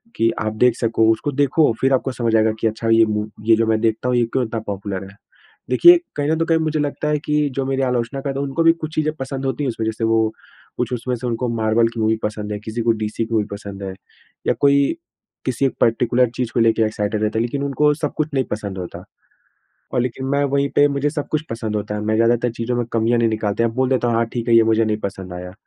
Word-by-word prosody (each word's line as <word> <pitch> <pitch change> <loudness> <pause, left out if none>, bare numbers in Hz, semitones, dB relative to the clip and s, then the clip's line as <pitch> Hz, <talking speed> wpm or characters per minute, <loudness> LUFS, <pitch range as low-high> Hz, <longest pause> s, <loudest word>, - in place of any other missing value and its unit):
कि 115 - +2
आप 110 0 -1
देख 125 -2 +4
सको, 115 -1 +2
उसको 115 +6 -1
देखो 145 +1 +3
फिर 135 0 +3
आपको 130 +1 +1
समझ 115 -3 0
आएगा 110 0 +4
कि 115 - +1
अच्छा 110 +1 -3
ये 115 0 +6
मू 105 0 -2 0.2
ये 115 0 +6
जो 115 - +2
मैं 110 -1 +2
देखता 115 +2 0
हूँ, 125 - +2
ये 120 - +3
क्यों 130 -2 +1
इतना 115 0 -4
पॉपुलर 100 -1 -4
है। - - -20 0.6
देखिए 350 +1 +8 0.2
कहीं 145 0 0
न 160 - +2
तो 165 - +1
कहीं 165 -1 +2
मुझे 155 -1 -1
लगता 145 +1 -2
है 150 - +2
कि 150 -1 +1
जो 135 - -1
मेरी 135 0 -1
आलोचना 125 +1 -1
करते 135 0 -3
हैं 140 - -1
उनको 135 +5 0
भी 165 - +7
कुछ 155 0 -5
चीज़ें 155 0 0
पसंद 135 -1 -5
होती 135 +2 -2
हैं - - 0
उसमें 115 -2 -3
जैसे 110 +1 -3
वो 115 0 +3 0.6
कुछ - - -2
उसमें 125 +1 -2
से 125 +1 -5
उनको 120 +1 -1
मार्वल 110 +1 +2
की 115 0 -8
मूवी 110 0 +2
पसंद 105 0 -3
है, 105 - -4
किसी 110 +2 -5
को 115 - +3
डीसी 110 0 -2
की 115 - -7
मूवी 110 -2 +2
पसंद 100 -1 -7
है। 95 -1 -4 0.5
या - - +4
कोई 140 - +3 0.5
किसी 130 +1 0
एक 135 - 0
पार्टिकुलर 120 +1 +3
चीज़ 125 -2 -2
को - - +1
लेके 115 0 +3
एक्साइटेड 105 0 -2
रहता 110 +1 0
है - - +2
लेकिन 140 +4 -3
उनको 150 +2 +2
सब 150 -1 -3
कुछ 155 0 0
नहीं 135 -1 +2
पसंद 100 -2 -4
होता। 90 -2 -7 0.9
और - - +2
लेकिन 125 +2 -4
मैं 140 +1 +1
वहीं 140 0 +1
पे 145 - +6
मुझे 140 +1 0
सब 145 -1 -4
कुछ 155 0 0
पसंद 110 -2 -3
होता 105 0 -3
है। - - -3
मैं 110 +1 +1
ज़्यादातर 120 +1 +2
चीज़ों 120 +1 -2
में 120 - 0
कमियाँ 115 +1 +2
नहीं 115 - +3
निकालता 110 +1 -1
या 115 - +3
बोल 130 0 +2
देता 125 -2 +1
हूँ 115 - +1
हाँ, 115 - +2
ठीक 115 +1 -5
है 115 - +4
ये 115 - +7
मुझे 115 0 +3
नहीं 110 -1 0
पसंद 95 -2 -5
आया। 90 +1 -7
115 Hz, 260 wpm, -20 LUFS, 110-135 Hz, 0.9 s, देखिए